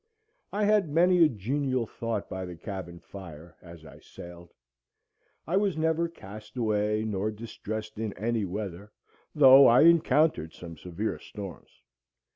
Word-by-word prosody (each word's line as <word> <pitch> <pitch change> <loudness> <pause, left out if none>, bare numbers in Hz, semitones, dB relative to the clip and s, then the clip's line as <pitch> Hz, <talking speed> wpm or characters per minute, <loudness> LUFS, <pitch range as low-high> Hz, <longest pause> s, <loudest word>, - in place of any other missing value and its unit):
I 210 +1 -1
had 205 -5 +3
many 175 +3 +4
a 155 - +5
genial 130 +3 -2
thought 115 -2 -4
by 95 0 -5
the 90 -1 -8
cabin 90 -1 -7
fire 85 -3 -12
"as 85 -2 -13
I - - -13
sailed." 85 0 -12 0.9
I 175 +4 0
was 200 -5 0
never 160 +1 0
cast 110 -6 -12
away 105 -2 0
nor 105 -1 -2
distressed 110 -1 -7
in 110 -2 -2
any 115 +1 -2
weather, 100 +1 -6 0.4
though 135 -2 +8
I 120 - +6
encountered 155 - +3
some 85 -2 -10
severe 90 +7 -4
storms. 100 -5 -9
110 Hz, 140 wpm, -28 LUFS, 95-145 Hz, 0.9 s, though